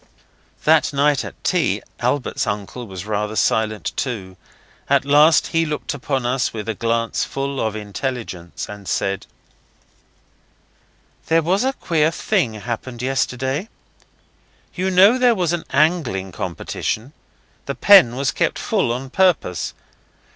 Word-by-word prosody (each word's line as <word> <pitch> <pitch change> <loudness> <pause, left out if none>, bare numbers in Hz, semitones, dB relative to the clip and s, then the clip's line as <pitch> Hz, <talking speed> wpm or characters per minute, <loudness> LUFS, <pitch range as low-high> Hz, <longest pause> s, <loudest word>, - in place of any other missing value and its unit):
That 155 0 +4
night 140 0 +2
at - - -10
tea - - +1 0.2
Albert's 140 -1 -1
uncle 105 +4 -4
was 95 -1 -7
rather 105 0 -2
silent 110 -1 0
too. 100 -8 -4 0.5
At 140 0 +3
last 150 +3 +5
he 165 0 +2
looked 150 -2 -3
upon 135 -2 -2
us 125 +1 0
with 110 -1 -6
a 115 - -1
glance 115 +2 -1
full 135 0 -3
of 110 -1 -1
intelligence, 105 -4 -5
and 105 -2 -10
said 95 -1 -1 2.0
'There 165 0 +3
was 185 +7 +1
a 265 +1 +1
queer 160 - +1
thing 165 - 0
happened 120 +2 -5
yesterday. 135 - -1 1.0
You 185 +1 -1
know 195 +7 +6
there 245 -2 +4
was 175 -4 0
an 175 - -3
angling 140 - +1
competition. 110 - -4 0.5
The 140 - -3
pen 190 -13 +7
was 135 +1 0
kept - - 0
full 115 - 0
on 130 +2 -4
purpose. 175 - +1
130 Hz, 135 wpm, -20 LUFS, 110-160 Hz, 2.0 s, pen